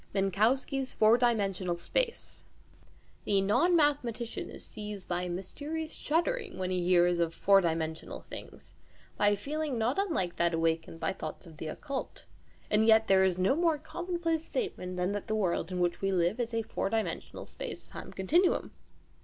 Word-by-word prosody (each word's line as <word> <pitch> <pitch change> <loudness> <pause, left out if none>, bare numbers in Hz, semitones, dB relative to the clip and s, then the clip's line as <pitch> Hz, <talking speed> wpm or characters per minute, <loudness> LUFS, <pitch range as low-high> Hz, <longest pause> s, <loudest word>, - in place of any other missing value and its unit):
MINKOWSKI'S 230 - +1
FOUR 220 +1 +6
DIMENSIONAL 195 -7 +1
SPACE 465 - -2 0.8
The 200 -1 +3
non 250 - +3
mathematician 255 -7 0
is - - -10
seized 210 -2 -7
by 175 0 -1
a 180 - -3
mysterious 295 - -4
shuddering 410 +7 -1
when 185 0 -2
he 180 -1 0
hears 175 -1 +4
of 170 -1 0
"four 195 0 +5
dimensional" 160 -2 -2
things, - - -10 0.4
by 205 - +2
a 205 - +3
feeling 290 +4 -3
not 235 - +1
unlike 315 - -1
that 170 -1 +2
awakened 165 0 -1
by - - -1
thoughts 190 - -7
of 160 -3 -13
the 160 - -5
occult. 270 - -5 0.5
And 215 +1 +4
yet 220 0 +6
there 190 -1 +6
is 185 -2 +2
no 190 +8 +3
more 330 -1 +2
common 345 +4 -4
place 330 -2 0
statement 360 - -3
than 180 +2 0
that 205 -1 -4
the 220 - 0
world 190 -3 0
in 180 - -2
which 175 -1 0
we 195 0 +1
live 180 +4 +1
is 235 -1 -1
a 230 -1 -1
four 205 - -2
dimensional 220 0 -3
space - - -7
time - - -9
continuum. 335 - +2
210 Hz, 175 wpm, -30 LUFS, 180-290 Hz, 0.8 s, FOUR